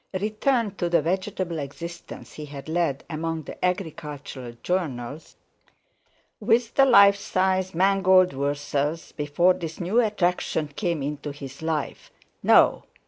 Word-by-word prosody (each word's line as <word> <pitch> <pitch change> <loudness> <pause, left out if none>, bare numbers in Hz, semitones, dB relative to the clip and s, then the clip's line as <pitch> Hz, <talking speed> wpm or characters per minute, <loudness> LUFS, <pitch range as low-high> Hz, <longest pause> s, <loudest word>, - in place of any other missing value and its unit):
Return 215 +1 0
to 175 - -1
the 170 -3 +3
vegetable 185 -1 -2
existence 170 +4 -8
he 150 - -7
had 140 0 -9
led 160 -4 -1
among 165 0 -3
the - - -10
agricultural 150 -8 -4
journals 150 -5 -3 1.0
with 230 +1 +2
the 275 - +5
life 200 -5 +7
size 185 -2 0
mangold 185 -1 +4
wurzels, 145 +3 -2
before 150 +5 +2
this 165 -3 -7
new 195 +7 +2
attraction 180 -7 0
came 170 -1 -2
into 145 +1 -4
his 140 -1 -10
life—no! 160 -2 +1
170 Hz, 120 wpm, -25 LUFS, 145-190 Hz, 1.0 s, life